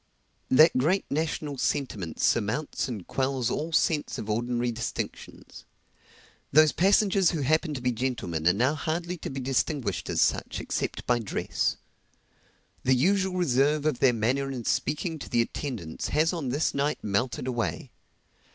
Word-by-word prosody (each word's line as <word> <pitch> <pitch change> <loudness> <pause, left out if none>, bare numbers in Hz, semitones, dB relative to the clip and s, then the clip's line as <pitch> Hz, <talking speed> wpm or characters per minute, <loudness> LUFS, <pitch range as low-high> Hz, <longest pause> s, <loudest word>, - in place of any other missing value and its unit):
That 155 +5 +6
great 175 +9 +2
national 150 -2 -2
sentiment 110 - -2
surmounts 115 +9 0
and 110 -8 -6
quells 130 -3 -1
all 160 +3 -2
sense 160 -2 +1
of 105 - -4
ordinary 120 +2 0
distinctions. 115 0 -6 0.9
Those 155 +1 +6
passengers 195 -1 +3
who 160 - -2
happen 155 +2 +1
to 130 - -5
be 125 0 +1
gentlemen 110 -10 -2
are 90 - +6
now 125 +8 +2
hardly 170 +3 -3
to - - -6
be 135 - -5
distinguished 130 - -1
as - - -1
such - - +1
except - - -3
by 120 -1 +2
dress. 110 - -1 1.0
The 130 0 +3
usual 190 +7 +2
reserve 145 -2 +2
of 150 -5 +1
their 130 - +5
manner 125 +5 0
in 125 -4 -5
speaking 155 +5 -1
to - - -8
the 120 -2 +3
attendants 115 - -5
has 160 +3 +2
on 155 -7 -3
this 145 +5 0
night 145 +2 -1
melted 120 +6 -1
away. 120 -3 -3
135 Hz, 150 wpm, -27 LUFS, 120-155 Hz, 1.0 s, That